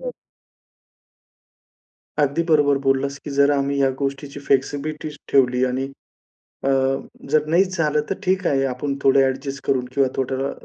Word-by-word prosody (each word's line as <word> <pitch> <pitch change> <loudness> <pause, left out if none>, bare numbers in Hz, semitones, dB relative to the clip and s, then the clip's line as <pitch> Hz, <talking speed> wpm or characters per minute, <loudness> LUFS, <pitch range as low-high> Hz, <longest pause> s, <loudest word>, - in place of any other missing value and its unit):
हो. - - -5 2.1
अगदी 145 +2 +2
बरोबर 145 -3 +4
बोललास, 135 0 0
की 145 - -8
जर 140 0 +5
आम्ही 140 0 0
ह्या 135 -1 +3
गोष्टीची 140 0 -4
फ्लेक्सिबिलिटी 145 +3 -1 0.2
ठेवली 125 -2 +3
आणि, 130 +1 -1 0.8
अ, 135 - +1 0.6
जर 150 +1 +3
नाहीच 185 +3 +2
झालं 150 -2 +2
तर 195 - 0
ठीक 185 -1 +1
आहे. 135 -1 +2
आपण 135 +2 -2
थोडे 135 0 +5
एडजस्ट 135 +1 -4
करून 130 -2 +1
किंवा 135 -1 +3
थोडं 135 +1 -1
140 Hz, 140 wpm, -22 LUFS, 135-150 Hz, 2.1 s, जर